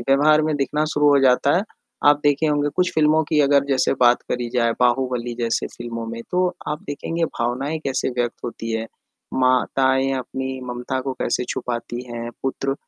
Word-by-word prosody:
व्यवहार 145 Hz, +5 st, +4 dB
में 155 Hz, 0 st, 0 dB
दिखना 150 Hz, +2 st, 0 dB
शुरू 150 Hz, 0 st, +3 dB
हो 145 Hz, -1 st, +5 dB
जाता 130 Hz, +1 st, +4 dB
है, 185 Hz, -, +2 dB, 0.4 s
आप 145 Hz, 0 st, +6 dB
देखे 145 Hz, +2 st, +2 dB
होंगे 145 Hz, -1 st, +1 dB
कुछ 180 Hz, -1 st, +2 dB
फ़िल्मों 155 Hz, 0 st, +4 dB
की 150 Hz, 0 st, 0 dB
अगर 140 Hz, -1 st, +4 dB
जैसे 135 Hz, -2 st, +2 dB
बात 120 Hz, 0 st, +5 dB
करी 120 Hz, -1 st, -2 dB
जाए, 115 Hz, -2 st, +2 dB
बाहुबली 125 Hz, -1 st, +1 dB
जैसे 115 Hz, -1 st, 0 dB
फ़िल्मों 115 Hz, -1 st, -5 dB
में 115 Hz, +1 st, -6 dB
तो 180 Hz, 0 st, +2 dB, 0.2 s
आप 150 Hz, 0 st, -3 dB
देखेंगे 165 Hz, +4 st, -2 dB
भावनाएँ 135 Hz, +3 st, -2 dB
कैसे 135 Hz, -1 st, -1 dB
व्यक्त 120 Hz, -1 st, -2 dB
होती 115 Hz, -1 st, -5 dB
हैं। 110 Hz, 0 st, -2 dB, 0.5 s
माताएँ 130 Hz, +1 st, +2 dB
अपनी 130 Hz, +1 st, -5 dB
ममता 125 Hz, +2 st, -3 dB
को 135 Hz, +1 st, -3 dB
कैसे 120 Hz, -, 0 dB
छुपाती 120 Hz, -1 st, -4 dB
हैं, 120 Hz, 0 st, -5 dB
पुत्र 135 Hz, 0 st, -1 dB
130 Hz, 175 wpm, -22 LUFS, 120-145 Hz, 0.5 s, आप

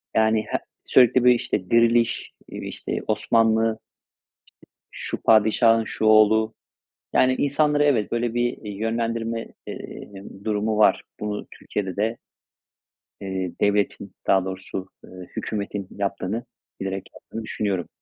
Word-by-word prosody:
Yani 110 Hz, 0 st, +3 dB
her -, -, -1 dB, 0.2 s
sürekli 125 Hz, 0 st, +5 dB
böyle 125 Hz, 0 st, +7 dB
işte 95 Hz, -5 st, -2 dB
Diriliş, 115 Hz, 0 st, +3 dB, 0.2 s
işte -, -, -5 dB
Osmanlı, 115 Hz, -1 st, +3 dB, 1.2 s
işte -, -, -8 dB
şu -, -, -3 dB
padişahın 115 Hz, +1 st, +5 dB
şu 110 Hz, -, -3 dB
oğlu, 110 Hz, +1 st, +5 dB, 0.6 s
yani, 130 Hz, 0 st, +4 dB
insanları 145 Hz, +1 st, +2 dB
evet, 130 Hz, -8 st, +2 dB
böyle 120 Hz, 0 st, 0 dB
bir, 120 Hz, +1 st, 0 dB
iii, 105 Hz, -2 st, -8 dB
yönlendirme, 115 Hz, 0 st, -2 dB, 0.2 s
eee, -, -, -8 dB, 0.3 s
durumu 105 Hz, 0 st, 0 dB
var. 110 Hz, -, +4 dB, 0.2 s
Bunu 105 Hz, -1 st, -4 dB
Türkiye'de 95 Hz, -3 st, -4 dB
de 110 Hz, +3 st, 0 dB, 1.0 s
eee, 95 Hz, -2 st, -3 dB
devletin, 100 Hz, -1 st, +1 dB, 0.2 s
daha 95 Hz, -1 st, +4 dB
doğrusu, 95 Hz, 0 st, -6 dB, 0.2 s
ııı, 90 Hz, -1 st, -10 dB
hükümetin 100 Hz, -2 st, -3 dB
yaptığını, 100 Hz, +3 st, -2 dB, 0.3 s
bilerek 95 Hz, 0 st, -4 dB
yaptığını 115 Hz, -, -8 dB
düşünüyorum. 100 Hz, -5 st, -2 dB
110 Hz, 120 wpm, -24 LUFS, 100-115 Hz, 1.2 s, böyle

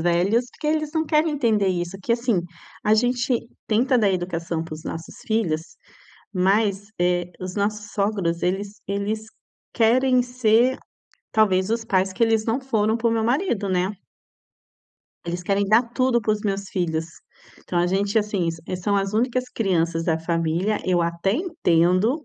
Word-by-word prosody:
velhos, 180 Hz, +8 st, +2 dB
porque 300 Hz, -, -7 dB
eles 310 Hz, -1 st, 0 dB
não 320 Hz, 0 st, +1 dB
querem 305 Hz, +1 st, +2 dB
entender 225 Hz, -8 st, +2 dB
isso, 175 Hz, -1 st, -2 dB
porque 195 Hz, +4 st, -2 dB
assim, 235 Hz, -6 st, +1 dB, 0.4 s
a 215 Hz, -, +5 dB
gente 245 Hz, +1 st, +1 dB, 0.3 s
tenta 245 Hz, +4 st, +2 dB
dar 205 Hz, -3 st, +3 dB
educação 170 Hz, -3 st, -2 dB
para 160 Hz, -, -7 dB
os 155 Hz, -, -11 dB
nossos 165 Hz, 0 st, -7 dB
filhos 190 Hz, -8 st, 0 dB, 0.7 s
mas, 195 Hz, +2 st, +2 dB
eh, 175 Hz, 0 st, +1 dB
os 185 Hz, 0 st, -5 dB
nossos 210 Hz, 0 st, -2 dB
sogros 200 Hz, -5 st, -1 dB
eles 200 Hz, +3 st, -2 dB
eles 205 Hz, +2 st, -2 dB, 0.5 s
querem 250 Hz, +2 st, +4 dB
ser, 245 Hz, 0 st, +2 dB, 0.5 s
talvez, 195 Hz, -3 st, +3 dB
os 230 Hz, 0 st, 0 dB
pais 190 Hz, -2 st, +1 dB
que 235 Hz, -, +1 dB
eles 225 Hz, -1 st, +2 dB
não 235 Hz, +4 st, 0 dB
foram 220 Hz, -4 st, +1 dB
para 235 Hz, 0 st, 0 dB
o -, -, +2 dB
meu 225 Hz, -1 st, +1 dB
marido, 240 Hz, -, 0 dB
né. 185 Hz, +1 st, +1 dB, 1.4 s
Eles 175 Hz, +1 st, -3 dB
querem 200 Hz, +2 st, +1 dB
dar 215 Hz, +4 st, +5 dB
tudo 255 Hz, -2 st, +2 dB
para 215 Hz, -1 st, +1 dB
os 210 Hz, -, -2 dB
meus 200 Hz, -1 st, -2 dB
filhos. 160 Hz, -4 st, -1 dB, 0.5 s
Então, 175 Hz, -, -3 dB
a 175 Hz, -, +3 dB
gente, 200 Hz, +4 st, +1 dB
assim, 205 Hz, -5 st, -1 dB, 0.2 s
s 185 Hz, -, -3 dB
são 200 Hz, +2 st, +1 dB
as 195 Hz, 0 st, -1 dB
únicas 250 Hz, +3 st, +1 dB
crianças 170 Hz, -5 st, 0 dB
da 160 Hz, -2 st, +1 dB
família, 165 Hz, +5 st, 0 dB
eu 180 Hz, -2 st, +2 dB
até 170 Hz, +3 st, 0 dB
entendo, 225 Hz, -, +1 dB
205 Hz, 165 wpm, -23 LUFS, 180-230 Hz, 1.4 s, a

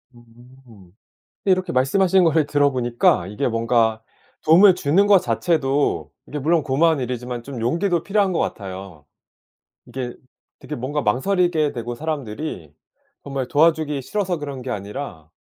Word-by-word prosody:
음 120 Hz, 0 st, -18 dB, 1.2 s
근데 195 Hz, -, +4 dB
이렇게 185 Hz, -1 st, -1 dB
말씀하신 180 Hz, +8 st, +3 dB
거를 160 Hz, -2 st, +3 dB
들어보니까 125 Hz, -10 st, +2 dB
이게 105 Hz, +5 st, -2 dB
뭔가 115 Hz, -1 st, +1 dB, 0.4 s
도움을 180 Hz, +4 st, +7 dB
주는 180 Hz, +4 st, +2 dB
것 205 Hz, -1 st, +6 dB
자체도 145 Hz, -5 st, 0 dB, 0.2 s
이게 150 Hz, -, -5 dB
물론 160 Hz, +3 st, +2 dB
고마운 150 Hz, +3 st, +2 dB
일이지만 125 Hz, -1 st, -4 dB
좀 130 Hz, -1 st, -7 dB
용기도 170 Hz, -, 0 dB
필요한 200 Hz, -1 st, +1 dB
것 -, -, -1 dB
같아요. 95 Hz, -5 st, -5 dB, 0.8 s
이게 125 Hz, 0 st, -6 dB, 0.4 s
되게 -, -, -7 dB
뭔가 140 Hz, +5 st, -3 dB
망설이게 155 Hz, -, +1 dB
되고 120 Hz, -2 st, -5 dB
사람들이 140 Hz, -, -5 dB, 0.5 s
정말 135 Hz, -3 st, -4 dB
도와주기 155 Hz, -2 st, +2 dB
싫어서 185 Hz, +4 st, -2 dB
그런 140 Hz, -3 st, -6 dB
게 130 Hz, -, -7 dB
아니라 100 Hz, -, -6 dB
140 Hz, 325 characters per minute, -21 LUFS, 120-165 Hz, 1.2 s, 도움을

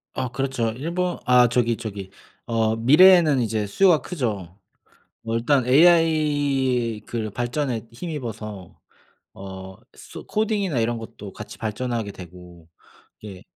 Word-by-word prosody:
아 130 Hz, -1 st, -2 dB
그렇죠. 130 Hz, -2 st, -2 dB
일본 175 Hz, +5 st, -2 dB
아 125 Hz, -1 st, +5 dB
저기 120 Hz, -1 st, +1 dB
저기 100 Hz, -4 st, -7 dB, 0.3 s
어 110 Hz, -2 st, 0 dB
미래에는 155 Hz, +4 st, +6 dB
이제 110 Hz, -2 st, -1 dB
수요가 175 Hz, -, +3 dB
크죠. 105 Hz, -, -4 dB, 0.6 s
뭐 115 Hz, 0 st, -3 dB
일단 125 Hz, +2 st, +2 dB
AI 145 Hz, -6 st, +2 dB
그 110 Hz, -3 st, -4 dB
발전에 120 Hz, 0 st, -3 dB
힘입어서 115 Hz, -, -7 dB, 0.6 s
어 95 Hz, -1 st, -9 dB, 0.2 s
쏘 -, -, -12 dB
코딩이나 205 Hz, -, -1 dB
이런 115 Hz, +1 st, 0 dB
것도 105 Hz, -3 st, -10 dB
같이 105 Hz, -, -10 dB
발전하게 115 Hz, -1 st, -3 dB
되고 90 Hz, -2 st, -13 dB, 0.6 s
예 95 Hz, -3 st, -9 dB
120 Hz, 245 characters per minute, -23 LUFS, 105-145 Hz, 0.6 s, 미래에는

